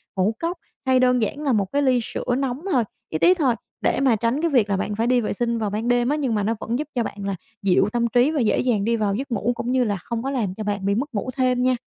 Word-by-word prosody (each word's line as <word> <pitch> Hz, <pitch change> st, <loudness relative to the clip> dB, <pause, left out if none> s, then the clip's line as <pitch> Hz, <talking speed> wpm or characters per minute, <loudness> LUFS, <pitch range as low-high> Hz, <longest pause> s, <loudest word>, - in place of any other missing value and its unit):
ngũ 190 Hz, +3 st, +1 dB
cốc 340 Hz, +2 st, -2 dB, 0.3 s
hay 260 Hz, -1 st, +4 dB
đơn 250 Hz, -1 st, +3 dB
giản 220 Hz, +6 st, -2 dB
là 280 Hz, -, +1 dB
một 205 Hz, -3 st, +2 dB
cái 285 Hz, -, +1 dB
ly 260 Hz, -3 st, +3 dB
sữa -, -, -5 dB
nóng 270 Hz, 0 st, -2 dB
thôi, 250 Hz, -7 st, +3 dB, 0.3 s
ít 155 Hz, -, -3 dB
ít 360 Hz, -, +7 dB
thôi 260 Hz, -6 st, +3 dB, 0.3 s
để -, -, +1 dB
mà 265 Hz, -4 st, +4 dB
tránh 235 Hz, +6 st, 0 dB
cái 335 Hz, -, +1 dB
việc 235 Hz, -7 st, +3 dB
là 195 Hz, -, +1 dB
bạn 205 Hz, +2 st, -2 dB
phải 225 Hz, +2 st, 0 dB
đi 250 Hz, 0 st, +3 dB
vệ 215 Hz, -, -2 dB
sinh 235 Hz, +2 st, -1 dB
vào 215 Hz, -2 st, -1 dB
ban 215 Hz, +3 st, -3 dB
đêm 245 Hz, 0 st, +2 dB
á, 295 Hz, -, +2 dB
nhưng 270 Hz, -7 st, -1 dB
mà 205 Hz, -, 0 dB
nó 225 Hz, +3 st, 0 dB
vẫn 235 Hz, +4 st, -2 dB
giúp 300 Hz, -, -3 dB
cho 240 Hz, -, +1 dB
bạn 210 Hz, -, -6 dB
là 195 Hz, -1 st, -1 dB, 0.3 s
dịu 195 Hz, +1 st, +3 dB
tâm 235 Hz, -1 st, +1 dB
trí 245 Hz, +5 st, +3 dB
và 310 Hz, -, -1 dB
dễ 220 Hz, -, +2 dB
dàng 230 Hz, -6 st, +1 dB
đi 230 Hz, +1 st, +2 dB
vào 210 Hz, -3 st, 0 dB
giấc 265 Hz, +4 st, -5 dB
ngủ, 230 Hz, +1 st, 0 dB
cũng 240 Hz, +1 st, -3 dB
như 255 Hz, -1 st, +3 dB
là 205 Hz, -4 st, -1 dB
không 230 Hz, +5 st, -5 dB
có 270 Hz, -, -2 dB
làm 225 Hz, -9 st, -1 dB
cho 215 Hz, -, -4 dB
bạn 205 Hz, -2 st, -2 dB
bị 200 Hz, 0 st, +2 dB
mất 270 Hz, +5 st, -3 dB
ngủ 210 Hz, +4 st, -2 dB
thêm 255 Hz, -1 st, +2 dB
nha. 255 Hz, 0 st, +3 dB
240 Hz, 310 wpm, -23 LUFS, 210-260 Hz, 0.3 s, ít